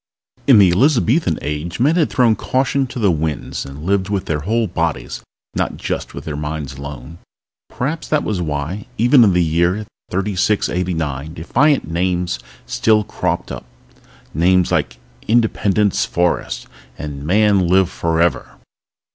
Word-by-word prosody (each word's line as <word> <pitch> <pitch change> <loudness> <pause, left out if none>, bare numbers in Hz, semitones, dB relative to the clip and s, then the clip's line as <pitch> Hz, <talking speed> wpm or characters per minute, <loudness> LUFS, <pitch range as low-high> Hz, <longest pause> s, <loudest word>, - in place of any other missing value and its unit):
In 130 -5 +8
the 95 -3 +6
Elizabethan 125 - +2
Age 75 +5 -4
men 145 +7 +3
had 165 -4 +2
thrown 120 -4 +3
caution 135 +2 0
to 125 - -9
the 105 -6 +3
winds 80 -4 -3
and 70 +2 -9
lived 95 +1 0
with 100 -2 -1
their 75 -1 -1
whole 110 +9 0
bodies, 80 - -3 0.3
not - - -2
just - - -4
with - - -8
their 75 - -4
minds 75 -2 -4
alone. 70 +3 -8 0.5
Perhaps 150 +6 -3
that 155 -1 +1
was 100 -4 -2
why, 75 +5 -3
even 120 +3 +6
in 100 -4 +4
the 90 0 +3
year 85 +6 +1 0.2
3689, 90 -6 -1
defiant 135 - +2
names 90 -3 -1 0.3
still 110 -1 +2
cropped - - -3
up. - - -7 0.7
Names 90 +3 +3
like - - 0 0.3
Independence 105 -3 +2
Forest 90 0 -1 0.3
and 70 -2 -6
Man, 100 +2 +3
Live 95 0 +3
Forever! 85 +1 0
90 Hz, 140 wpm, -19 LUFS, 80-110 Hz, 0.7 s, In